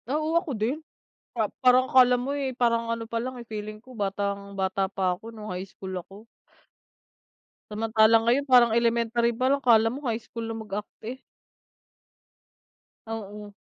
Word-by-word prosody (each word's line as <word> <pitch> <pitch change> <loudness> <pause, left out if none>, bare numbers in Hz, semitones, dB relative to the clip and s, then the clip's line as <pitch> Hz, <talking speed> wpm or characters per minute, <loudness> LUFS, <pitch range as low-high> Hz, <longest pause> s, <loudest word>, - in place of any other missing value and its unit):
Oo, 310 +3 0
ako 335 -7 0
din. 245 +9 -1 0.5
Ah, 220 -3 0
parang 255 0 +4
akala 250 -1 +6
mo 250 +3 -2
eh 275 -3 -2
parang 230 -1 +1
ano 230 0 -2
palang 240 +3 -3
feeling 215 -1 -7
ko 255 - -15
batang-bata 200 -2 -2
pa 185 -2 -1
ako 230 +1 -11
nung 215 -2 -7
high 180 +2 -5
school 190 0 -9
ako 195 +5 -14 1.4
Samantalang 220 +1 +3
ngayon 255 +4 +2
parang 245 -2 +6
elementary 235 0 +2
palang, 265 +3 +2
akala 225 -3 +5
mo 275 0 -5
high 225 - 0
school 230 +1 -7
na 225 - -4
magarte. 215 +4 -7 1.8
Oo. 210 -2 -7
225 Hz, 140 wpm, -26 LUFS, 210-250 Hz, 1.8 s, akala